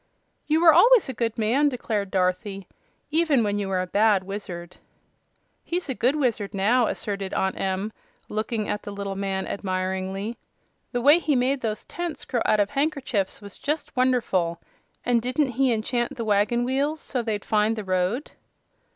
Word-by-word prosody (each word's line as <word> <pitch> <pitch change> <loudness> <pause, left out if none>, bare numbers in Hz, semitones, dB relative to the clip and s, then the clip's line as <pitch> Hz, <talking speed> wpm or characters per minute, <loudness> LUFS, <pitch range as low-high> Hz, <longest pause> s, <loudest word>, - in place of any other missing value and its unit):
"You 310 +2 +2
were 330 -2 +8
always 455 +7 +6
a - - -2
good 230 -2 -2
man," 245 +7 +3
declared 220 -6 -2
Dorothy, 190 +1 -1 0.4
"even 310 -6 +3
when 205 -1 0
you 200 - -2
were 185 -1 0
a - - -4
bad 205 +1 +3
wizard." 180 -3 -7 0.9
"He's 350 -2 -3
a - - 0
good 255 +3 +1
wizard 235 -9 -1
now," 225 +5 +3
asserted 200 -2 -3
Aunt 190 0 0
Em, 195 +3 -2 0.3
looking 215 0 -2
at 205 - -2
the - - -8
little 200 -1 -4
man 195 -1 -2
admiringly. 190 +3 -3 0.5
"The 245 -1 -2
way 295 +5 +7
he 310 -4 +1
made 260 +2 +1
those 215 -2 -3
tents 345 -2 -5
grow 240 - -1
out 215 - +3
of 205 - +2
handkerchiefs 275 -10 -1
was 200 -1 -11
just 300 +1 -3
wonderful! 225 -10 +1 0.5
And 240 -1 +3
didn't 255 +3 0
he 260 +1 +2
enchant 240 +4 -1
the 230 -3 -4
wagon 210 +3 +2
wheels 280 +5 0
so 255 -4 -2
they'd 215 -3 -3
find 215 +1 +2
the 215 - -4
road?" 185 +8 -1
220 Hz, 170 wpm, -25 LUFS, 195-260 Hz, 0.9 s, were